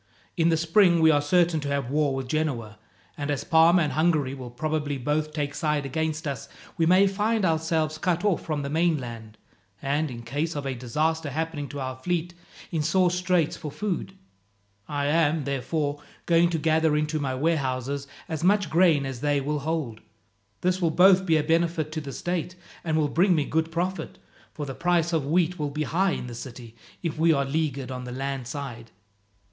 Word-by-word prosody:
In 170 -1 +3
the 165 - +3
spring 170 +2 +4
we 160 0 +6
are 145 -1 +3
certain 170 +1 +2
to 145 - -4
have 140 -3 -2
war 145 -2 +1
with 135 -1 -4
Genoa, 125 -8 -2 0.4
and 145 0 -4
as 145 -2 -1
Parma 170 0 +5
and 150 - -1
Hungary 155 -4 +1
will 130 -3 -7
probably 150 +2 -2
both 150 +4 -1
take 145 -2 -3
side 150 -2 -1
against 155 +2 -2
us, 140 -5 -5 0.3
we 165 - +2
may 185 +3 +6
find 210 +2 +1
ourselves 160 -1 0
cut 180 +1 0
off 195 -6 +1
from 150 -3 -2
the 140 - -3
mainland, 125 -10 -1 0.4
and, 145 +5 0
in 120 -2 -8
case 150 +7 -2
of 145 -1 -4
a 135 - -1
disaster 150 +6 -1
happening 155 0 -3
to 145 - -6
our 130 -1 -3
fleet, 175 +5 -2 0.4
in 160 - 0
sore 175 +3 +3
straits 180 -3 +1
for 155 - -6
food. 195 +1 -4 0.7
I 145 -1 -2
am, 155 0 +2
therefore, 145 +2 -2 0.2
going 170 0 +4
to 170 - -1
gather 160 -1 +2
into 155 +1 -1
my 135 -3 -2
warehouses 140 -2 -1 0.2
as 160 -3 -4
much 195 -2 +3
grain 165 -5 +4
as 130 -3 -5
they 145 -1 +2
will 150 +2 -2
hold. 145 -7 -3 0.6
This 185 +1 +1
will 170 - +3
both 190 +3 +5
be 160 -1 +4
a 150 - +1
benefit 165 -1 +1
to 155 0 -3
the 140 -2 -7
state, 175 +3 -3 0.3
and 160 -2 0
will 155 -2 +2
bring 175 +5 +3
me 150 -3 +1
good 160 +2 -1
profit, 180 +3 -3 0.3
for 150 - -5
the 135 - -5
price 170 +1 +1
of 155 -4 0
wheat 175 +2 +1
will 150 -1 -1
be 150 +2 -2
high 180 +6 +1
in - - -4
the 120 - -7
city 115 -1 -9 0.3
if 160 -3 -3
we 165 +1 +5
are 140 -3 +2
leaguered 140 -3 -2
on 125 -1 -5
the 125 - -6
land 135 -1 -4
side. 130 -5 -6
155 Hz, 195 wpm, -26 LUFS, 140-165 Hz, 0.7 s, we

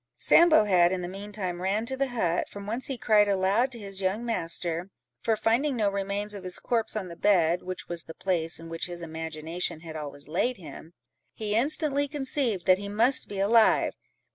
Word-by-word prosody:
Sambo 335 -8 +6
had, 180 -4 +4
in 185 -1 -2
the - - -3
mean 200 +3 -8
time, 185 -4 -4
ran 200 +4 0
to 265 +2 0
the 275 +1 0
hut, 180 -9 -1
from 200 0 -9
whence 230 +5 -3
he 270 - -3
cried 210 -3 +4
aloud 200 +6 +2
to 240 - -6
his 195 -3 -5
young 195 +5 -1
master; 175 -4 -2 0.3
for 225 - +1
finding 235 +6 +1
no 210 -4 +1
remains 200 +1 -2
of 200 -2 -8
his 180 -1 -2
corpse 230 -3 -1
on 205 -4 -3
the 170 - -9
bed 175 -3 +3
(which 185 0 -6
was 170 -1 -1
the 160 - -10
place 170 -3 +1
in 165 - -10
which 165 +1 -4
his 175 -1 -7
imagination 160 +1 -4
had 160 -1 -9
always 145 -2 -7
laid 245 +10 0
him), 160 0 -11 0.4
he 210 -2 -3
instantly 285 +3 +1
conceived 265 - -1
that 185 0 +5
he 200 0 -6
must 235 +6 +2
be 200 - -5
alive. 220 +3 +4
200 Hz, 205 wpm, -27 LUFS, 175-230 Hz, 0.4 s, Sambo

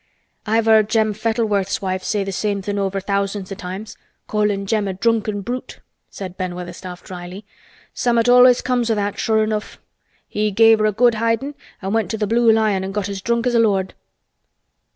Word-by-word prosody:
"I've 225 +1 +2
heard 220 -1 +5
Jem 220 -1 +2
Fettleworth's 215 -3 0
wife 185 -1 -3
say 205 0 -1
th' 195 - -4
same 200 0 -2
thing 205 +1 -2
over 195 0 -1
thousands 200 0 -2
o' - - -3
times—callin' 200 +1 -4
Jem 210 0 0
a 190 - -2
drunken 215 0 0
brute," 245 +6 -6 0.3
said 185 -2 -8
Ben 180 -1 -3
Weatherstaff 180 0 -8
dryly. 180 +2 -9 0.5
"Summat 235 -1 +1
allus 250 0 +6
come 250 -1 +1
o' 230 -1 0
that, 205 -1 -2
sure 220 -1 +2
enough. 215 -1 -3 0.5
He 210 0 -1
gave 225 +2 +5
her 215 - +3
a - - +2
good 240 +3 +3
hidin' 230 +6 -1 0.3
an' 195 +2 -2
went 220 -5 0
to 220 - -2
th' 210 -1 -1
Blue 230 +1 +4
Lion 215 -3 +2
an' 190 - -4
got 205 -1 -2
as 195 -1 -5
drunk 235 +3 0
as 250 - +1
a 235 - +4
lord." 195 -4 +1
210 Hz, 190 wpm, -20 LUFS, 195-225 Hz, 0.5 s, allus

